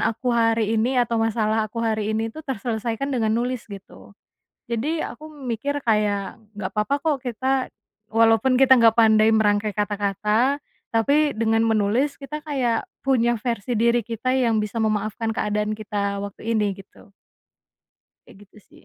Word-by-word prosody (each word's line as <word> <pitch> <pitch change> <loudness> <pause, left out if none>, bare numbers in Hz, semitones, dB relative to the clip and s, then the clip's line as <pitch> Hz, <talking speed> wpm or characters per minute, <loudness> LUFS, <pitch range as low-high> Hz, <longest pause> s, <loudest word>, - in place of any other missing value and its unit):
aku 245 +2 -1
hari 225 -1 +2
ini 250 +4 0
atau 235 -2 +1
masalah 220 -1 +1
aku 230 +2 -4
hari 215 -2 -1
ini 225 +1 -1
itu - - -10
terselesaikan 235 0 -3
dengan 220 -3 +1
nulis 245 0 -2
gitu. 200 0 -12 0.6
Jadi 280 +8 -1
aku 310 - -7
mikir 280 0 -3
kayak, 210 -4 0 0.2
gak 185 - -3
apa-apa 270 +7 0
kok 305 -2 0
kita, 260 +2 -1 0.4
walaupun 225 +3 +3
kita 265 -1 +7
nggak 230 -1 +4
pandai 220 0 +5
merangkai 210 -1 +2
kata-kata, 210 +6 0 0.3
tapi 285 +7 +2
dengan 225 -1 +1
menulis 225 +5 +1
kita 300 +2 -7
kayak 260 -7 -1 0.2
punya 240 -3 +1
versi 230 0 -2
diri 235 +1 +3
kita 235 +4 -2
yang 230 -4 +2
bisa 210 +1 -4
memaafkan 215 +1 -1
keadaan 210 -1 -1
kita 205 -2 -3
waktu 200 +3 -5
ini 210 -3 +1
gitu. 195 0 -17 1.2
Kayak 195 - -16
gitu 205 - -20
sih. - - -20
225 Hz, 150 wpm, -23 LUFS, 210-250 Hz, 1.2 s, kita